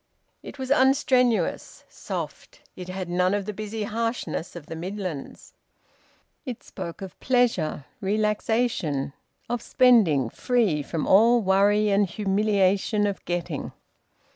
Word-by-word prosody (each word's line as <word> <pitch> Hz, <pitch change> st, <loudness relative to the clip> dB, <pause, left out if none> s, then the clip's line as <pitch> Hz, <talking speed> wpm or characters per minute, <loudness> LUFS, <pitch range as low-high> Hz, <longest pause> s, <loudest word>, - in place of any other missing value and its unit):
It -, -, -10 dB
was 260 Hz, 0 st, -5 dB
unstrenuous, 260 Hz, -, +2 dB
soft; -, -, -7 dB
it 180 Hz, -1 st, -8 dB
had 185 Hz, 0 st, -4 dB
none 180 Hz, +2 st, +1 dB
of 205 Hz, -1 st, -2 dB
the 210 Hz, -, -4 dB
busy 215 Hz, +1 st, -5 dB
harshness 225 Hz, -7 st, -3 dB
of 170 Hz, -4 st, -8 dB
the 165 Hz, -, -7 dB
Midlands; 180 Hz, -3 st, -6 dB, 0.9 s
it 250 Hz, -5 st, -7 dB
spoke 180 Hz, 0 st, -7 dB
of 190 Hz, -, -10 dB
pleasure, 235 Hz, -, +1 dB
relaxation, 210 Hz, -, 0 dB, 0.3 s
of 240 Hz, -1 st, -2 dB
spending 185 Hz, -, +4 dB
free 225 Hz, -, +1 dB
from 155 Hz, +2 st, -3 dB
all 230 Hz, +5 st, +5 dB
worry 205 Hz, +2 st, +3 dB
and 200 Hz, -1 st, +2 dB
humiliation 205 Hz, +1 st, +1 dB
of 200 Hz, -1 st, -3 dB
getting. 175 Hz, -1 st, -3 dB
205 Hz, 120 wpm, -25 LUFS, 180-230 Hz, 0.9 s, all